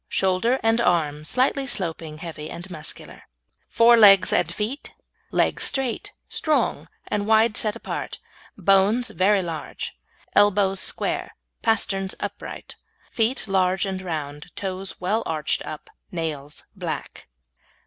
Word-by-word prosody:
Shoulder 195 +7 +1
and 225 +1 +3
Arm 155 -7 +1
Slightly 265 - +1
sloping, 165 - -2
heavy 155 -2 -7
and 175 +2 -7
muscular. 155 -3 -6 0.5
FORE 235 +1 +6
LEGS 200 -3 +7
AND 170 - +2
FEET 215 +10 -4 0.3
Legs - - +1
straight, 270 - -1 0.2
strong, 310 -1 0 0.2
and 210 - -1
set 205 - -5
wide 220 -1 +4
apart; - - -5 0.4
bones 200 +6 +3
very 195 +1 +3
large. 165 -3 -5 0.4
Elbows 200 -1 +4
square. - - -1 0.3
Pasterns 195 -4 0
upright. - - -6 0.3
Feet 230 +2 0
large 190 -1 +2
and 190 -1 -3
round. 150 -5 -5
Toes 190 -1 -4
well 205 +5 0
arched 155 -2 -1
up. 155 - -8 0.2
Nails 150 -4 -5
black. - - -6
195 Hz, 120 wpm, -24 LUFS, 170-225 Hz, 0.5 s, LEGS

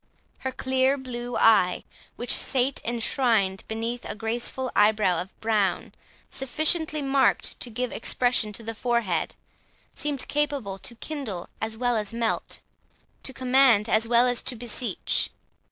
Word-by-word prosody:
Her 260 - -3
clear 260 +1 +1
blue 245 -2 -5
eye, 185 -5 +4 0.3
which 240 - 0
sat 260 +1 +1
enshrined 230 -4 +1
beneath 230 +2 -3
a - - -6
graceful 240 +4 -2
eyebrow 210 -5 +3
of 185 - -11
brown 210 -4 0 0.3
sufficiently 310 +3 +1
marked 275 0 +2
to 245 - -4
give 245 +2 -3
expression 240 -1 +1
to 230 - -1
the 225 +1 -4
forehead, 225 -7 -1 0.6
seemed 290 -3 -3
capable 280 -10 -1
to 235 - -7
kindle 230 - -5
as 220 0 -3
well 245 0 +1
as 210 -1 -2
melt, 230 -1 -2 0.6
to - - -4
command 255 -4 +4
as 220 0 +2
well 240 +1 +5
as 245 -1 +1
to 255 - -1
beseech. 240 +1 -1
240 Hz, 135 wpm, -26 LUFS, 220-260 Hz, 0.6 s, well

